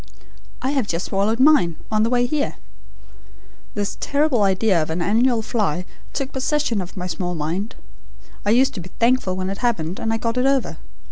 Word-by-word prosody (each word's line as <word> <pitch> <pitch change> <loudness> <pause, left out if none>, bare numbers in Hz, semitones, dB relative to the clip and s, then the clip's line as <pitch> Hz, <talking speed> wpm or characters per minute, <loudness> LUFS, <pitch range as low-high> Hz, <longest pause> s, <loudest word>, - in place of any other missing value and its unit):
I 265 - +1
have 270 -7 0
just 170 0 -2
swallowed 205 +4 0
mine, 260 - +5 0.2
on 215 0 +2
the 225 - +2
way 245 0 +2
here!' 285 +3 -1 1.2
This 205 -1 -2
terrible 285 -5 +1
idea 195 -2 +3
of 155 - -3
an 160 +2 -2
annual 225 +6 +2
fly 195 -7 -1 0.3
took 275 0 -3
possession 265 -5 0
of 180 +2 -8
my 180 - -3
small 180 -1 -3
mind. 170 +8 -3 0.7
I 205 - 0
used 260 +5 +4
to 205 - -5
be 175 - -10
thankful 235 -6 +2
when 185 +1 -2
it 195 - -5
happened, 190 -8 -1
and 225 - -1
I 225 - +1
got 230 +2 -2
it 255 - +3
over. 275 -2 +1
220 Hz, 190 wpm, -22 LUFS, 185-255 Hz, 1.2 s, mine